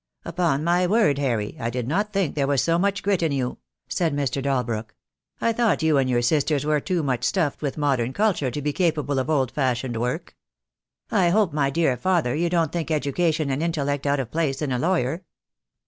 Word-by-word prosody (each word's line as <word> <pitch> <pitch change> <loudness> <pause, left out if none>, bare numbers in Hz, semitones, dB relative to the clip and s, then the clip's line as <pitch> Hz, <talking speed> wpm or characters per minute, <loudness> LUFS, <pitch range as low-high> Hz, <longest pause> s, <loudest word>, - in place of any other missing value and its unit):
"Upon 165 -4 0
my 175 +2 +2
word, 175 - +3
Harry, 115 -7 -1
I 115 - -2
did 120 0 -3
not 205 +9 0
think 195 -7 0
there 140 -2 0
was 140 -2 +2
so 170 0 +2
much 200 +1 0
grit 195 -3 +1
in 165 -2 +1
you," 130 -3 -2 0.3
said 165 -5 0
Mr. 140 -1 -1
Dalbrook. 125 -5 -2 0.4
"I 230 - +1
thought 225 -8 +1
you 155 -3 +3
and 130 -1 +1
your 120 -1 +1
sisters 145 +2 +1
were 150 0 +2
too 175 +1 -1
much 130 -4 -1
stuffed 150 +3 0
with 145 -1 -3
modern 135 -5 +1
culture 190 -6 +1
to 145 +4 -4
be 150 0 -1
capable 150 -6 0
of 130 - -2
old 135 -6 +1
fashioned 125 -3 -1
work." 125 +2 -3 0.8
"I 175 -2 +3
hope, 195 -2 +2
my 140 -2 +1
dear 140 -2 +1
father, 170 -8 +1
you 170 +3 0
don't 165 -3 +1
think 165 -2 -3
education 155 0 0
and 135 +3 -1
intellect 145 -4 -1
out 140 0 +2
of 125 -4 -4
place 155 -4 -1
in 150 -3 -2
a 125 - 0
lawyer?" 165 0 0
145 Hz, 210 wpm, -24 LUFS, 135-170 Hz, 0.8 s, word